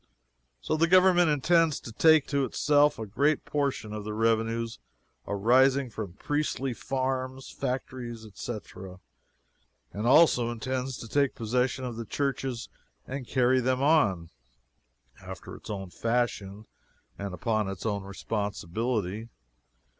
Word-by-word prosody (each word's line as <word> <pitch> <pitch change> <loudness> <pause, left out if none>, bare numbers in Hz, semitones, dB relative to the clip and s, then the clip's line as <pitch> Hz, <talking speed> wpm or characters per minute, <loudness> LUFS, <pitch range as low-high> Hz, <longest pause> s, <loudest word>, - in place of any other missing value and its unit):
So 155 - -1
the 165 +2 +3
Government 180 -1 +5
intends 160 +2 +3
to 120 - -9
take 160 +5 +5
to 140 -1 +1
itself 145 +3 +3
a 110 - -4
great 140 +9 +1
portion 140 -7 -2
of 105 -1 -5
the 105 0 -5
revenues 115 +1 0 0.5
arising 130 +5 +3
from 105 -5 -6
priestly 135 +2 -2
farms, 130 +1 -3
factories, 125 -3 -4
etc., 95 -3 -8 0.9
and 105 +3 -2
also 130 -4 +5
intends 130 +2 -3
to 115 - -8
take 140 +3 +1
possession 125 +3 -1
of 120 -2 -5
the 115 - -5
churches 135 -2 -2 0.4
and 130 -2 -6
carry 130 +1 +3
them 130 +1 0
on, 100 - +3 0.9
after - - -9
its - - -12
own 95 -3 -5
fashion 110 -3 -2 0.5
and 100 -2 -4
upon 110 +1 0
its 95 0 -6
own 100 -2 -1
responsibility. 105 +2 -3
120 Hz, 125 wpm, -28 LUFS, 110-135 Hz, 0.9 s, Government